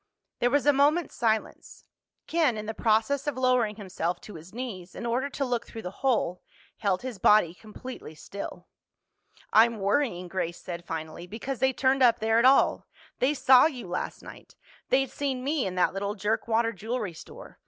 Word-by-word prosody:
There 245 - +3
was 285 +2 +2
a 290 - +6
moment's 295 +4 +2
silence. 220 -2 -2 0.4
Ken, 310 -9 +1
in 215 - -5
the 220 - -4
process 225 +6 +1
of 285 -3 -1
lowering 250 -4 +2
himself 180 -4 -3
to 210 - -11
his 165 +2 -11
knees 205 -7 -7
in - - -6
order 250 +4 0
to 280 0 -2
look 240 -2 -2
through 225 -1 -8
the 180 - -5
hole, 230 -9 +1 0.4
held 195 -2 0
his 250 -6 -6
body 185 -4 +5
completely 215 -3 -10
still. 200 +6 -8 0.9
"I'm 230 +1 +5
worrying," 200 -2 0
Grace 175 -1 -3
said 175 -1 -7
finally, 160 +1 -6
"because 230 +6 -5
they 265 0 +3
turned 265 +1 +1
up 240 -2 +6
there 225 0 +2
at 235 - +3
all. 265 +1 +4 0.3
They 275 +4 +2
saw 260 0 +6
you 250 - -7
last 180 - -4
night. - - -13 0.3
They'd 270 0 +2
seen 270 -3 -2
me 280 -5 0
in 185 - -5
that 180 - +2
little 200 +1 -3
jerkwater 225 +2 0
jewelry 220 -1 -4
store. - - -12
225 Hz, 180 wpm, -27 LUFS, 195-260 Hz, 0.9 s, a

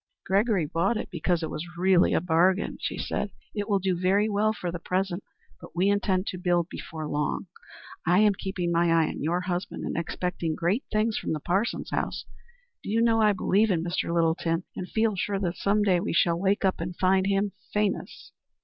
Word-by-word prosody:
"Gregory 200 -2 +2
bought 170 +9 0
it - - -5
because 175 0 0
it 160 - -3
was 175 +2 -7
really 185 0 +4
a - - +3
bargain," 180 +3 +2
she - - -3
said. 205 - -2 0.2
"It 205 0 -3
will 200 - +3
do 190 -1 0
very 190 +4 +2
well 215 +1 +2
for 180 -5 -4
the 175 - -5
present, 185 +1 -2 0.4
but - - -13
we 185 +3 +3
intend 195 -2 +1
to 185 - -4
build 175 -1 +1
before 155 -1 -6
long. 150 +5 -1 0.6
I 175 +1 +3
am 210 0 +5
keeping 185 -2 -3
my 170 0 +3
eye 165 -1 +3
on - - -6
your 170 +4 0
husband, 180 0 -3
and - - -3
am 170 - +1
expecting 170 -1 -3
great 185 - 0
things 215 +1 +1
from - - -2
the 155 - -2
Parsons 195 +9 -1
house. - - -2 0.6
Do - - -7
you 220 +2 +2
know, 230 -1 +3
I 210 -1 +5
believe 200 +3 +2
in 170 -4 +1
Mr. 175 -1 -2
Littleton, 165 0 +1
and 180 - -5
feel 220 -2 +1
sure 195 +3 -1
that 180 -3 -2
some 205 +1 +2
day 185 -3 +3
we 200 - -2
shall 170 0 +2
wake 195 +2 +1
up 190 -3 +1
and 175 +1 -4
find 190 +1 +3
him 200 0 +1 0.2
famous." 210 -1 -2
185 Hz, 210 wpm, -27 LUFS, 170-205 Hz, 0.6 s, am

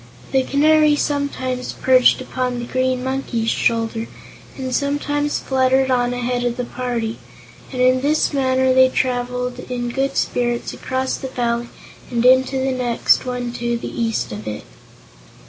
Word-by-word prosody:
The 265 - +3
Canary 300 +2 +4
sometimes 280 -4 -2
perched 255 0 +4
upon 255 -1 -2
the 240 - -4
Green 255 0 -1
Monkey's 260 -4 -1
shoulder 225 0 0 0.5
and 260 -1 -4
sometimes 290 +1 0
fluttered 265 0 +2
on 245 -1 +2
ahead 245 0 -2
of 240 0 -1
the 250 - -1
party, 240 -3 -3 0.5
and 255 - -5
in 255 0 +4
this 300 +2 +1
manner 260 -1 +2
they 260 0 +6
traveled 250 -1 -2
in 245 -1 -4
good 270 +3 -1
spirits 240 -1 -1
across 260 0 -2
that 265 - -7
valley 235 -1 -1 0.4
and 240 0 0
into 260 +1 +5
the 265 0 0
next 250 0 +1
one 245 -1 -3
to 240 0 -2
the - - -7
east 225 -1 -1
of 105 +1 -7
it. 105 - -5
255 Hz, 150 wpm, -20 LUFS, 245-265 Hz, 0.5 s, they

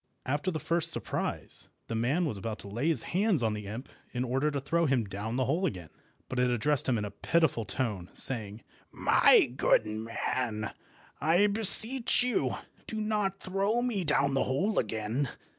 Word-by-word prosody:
After 145 +7 0
the 165 - -2
first 170 +1 +1
surprise, - - -2 0.2
the - - -5
man 130 +10 +1
was 140 - -2
about 110 +2 -4
to - - -10
lay 115 +9 -2
his 155 -8 +2
hands 185 - +2
on 110 -1 +1
the 105 -1 -6
imp 115 +7 -6 0.3
in 125 - 0
order 135 +4 +1
to 145 -1 -2
throw 165 +4 +1
him 130 -5 +2
down 105 +4 -4
the 130 0 +1
hole 170 +8 +1
again; 90 - -6 0.4
but 130 - -3
it 125 0 +3
addressed 135 +4 +2
him 120 - +2
in 105 - -2
a 100 - -6
pitiful 140 0 +1
tone, 100 -5 -3
saying— 110 -4 -2 0.3
"My - - +5
good 110 - +3
man, 110 0 -3 0.5
I 170 +7 +4
beseech 225 +5 +2
you 250 -1 0 0.3
do 220 - -4
not 210 -3 -1
throw 200 +5 0
me 225 -7 -1
down 140 -3 +2
the 135 - +2
hole 190 +12 +1
again. 110 +5 -1
135 Hz, 180 wpm, -30 LUFS, 110-175 Hz, 0.5 s, My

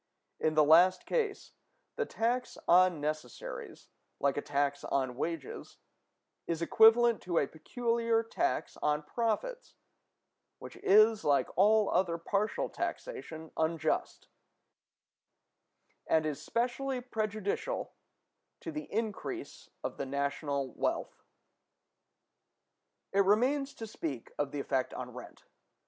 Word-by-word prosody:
In 155 0 +1
the 155 - +6
last 170 +5 +5
case, 435 -4 -2 0.4
the 465 - -1
tax 245 +2 -1
on 180 -1 +5
necessaries, 150 -4 -5 0.3
like 140 -1 +2
a 145 - -1
tax 140 0 -1
on 130 -2 -1
wages, 160 0 -5 0.7
is 170 -2 -1
equivalent 225 +6 +5
to 175 -2 -2
a - - +4
peculiar 230 - 0
tax 345 +10 -2
on 150 0 0
profits; 235 - -2 0.8
which - - -10
is, 215 +2 +5
like 140 -1 +2
all 210 +2 +5
other 170 -3 +1
partial 200 +5 -1
taxation, 160 - -5
unjust, 160 -1 -1 1.8
and 160 -1 +3
is 150 -2 -3
specially 250 +3 -1
prejudicial 215 - -3 0.7
to 330 - -5
the 305 -1 -7
increase 225 - -4
of - - -4
the - - -3
national 140 0 -2
wealth. - - -2 1.9
It 200 0 +5
remains 260 +8 +2
to 225 - -6
speak 150 - -5
of 145 -1 0
the 145 - -4
effect 130 -2 -1
on 125 -1 -6
rent. 125 0 -11
185 Hz, 115 wpm, -31 LUFS, 150-230 Hz, 1.9 s, the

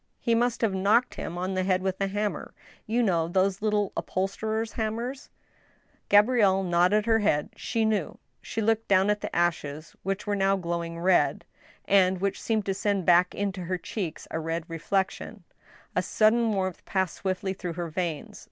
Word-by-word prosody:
He 235 - +1
must 240 +1 +1
have 220 -4 +2
knocked 205 +6 +2
him 175 - -6
on 185 +2 -2
the 185 - 0
head 185 0 +1
with 190 0 -2
a 195 - +2
hammer— 205 +1 -3 0.3
you 235 +3 +1
know 170 -6 +1
those 190 +2 +1
little 210 -2 +1
upholsterer's 220 +4 -2
hammers? 235 +5 -3 0.4
" - - -37
Gabrielle 205 -3 +4
nodded 180 +4 +3
her 225 -1 +3
head; 155 -9 +1
she 225 -2 -1
knew. 210 -6 -1 0.2
She 225 - -3
looked 225 +1 +1
down 195 +1 +4
at 210 0 -2
the - - -5
ashes 155 -3 -1
which 195 +1 -3
were 205 -1 0
now 195 0 +2
glowing 170 -2 -3
red, 180 +1 +2 0.4
and 190 -2 +3
which 195 +1 -2
seemed 220 -3 0
to 195 - 0
send 200 -2 -1
back 175 +1 +4
into 195 -3 -3
her 185 +2 -1
cheeks 175 -2 -5
a 160 - -2
red 165 +1 -3
reflection; 190 +4 -2 0.5
a 180 - +3
sudden 220 +4 +3
warmth 190 -3 -2
passed 190 -3 -1
swiftly 190 0 -2
through 180 -2 -5
her 170 0 -4
veins. 165 -2 -4
195 Hz, 180 wpm, -27 LUFS, 180-215 Hz, 0.5 s, Gabrielle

